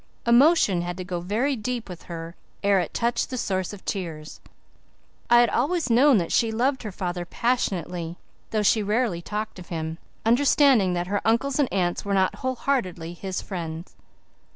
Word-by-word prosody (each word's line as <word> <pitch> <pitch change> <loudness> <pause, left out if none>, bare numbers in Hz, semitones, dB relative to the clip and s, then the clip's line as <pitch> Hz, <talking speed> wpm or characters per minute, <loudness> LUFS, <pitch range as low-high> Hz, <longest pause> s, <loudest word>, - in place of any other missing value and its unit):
Emotion 240 - +5
had 175 +1 -4
to 185 - -4
go 180 -1 -4
very 220 +11 0
deep 240 +1 -4
with 180 -3 -10
her 165 0 -6 0.3
ere 200 -1 +4
it 175 - -2
touched 235 0 0
the 255 - -4
source 190 -5 -1
of 205 -2 -11
tears. 160 -6 -5 0.9
I 240 0 +7
had 240 - +3
always 295 +2 0
known 260 +2 +6
that 170 -3 -1
she 230 -2 +2
loved 255 +4 0
her 215 - -5
father 180 -1 -3
passionately, 175 -6 -2 0.3
though 215 -1 0
she 215 +2 +4
rarely 210 -3 0
talked 210 +2 -5
of 175 - -11
him, 160 -1 -4 0.3
understanding 245 -4 +4
that 175 0 -1
her 200 +2 -1
uncles 260 +5 +1
and 280 - +2
aunts 175 -3 0
were 200 -1 -1
not 190 +2 +2
whole 260 +3 -2
heartedly 185 -12 -2
his 185 +1 -5
friends. 170 -2 -6
200 Hz, 175 wpm, -25 LUFS, 175-240 Hz, 0.9 s, I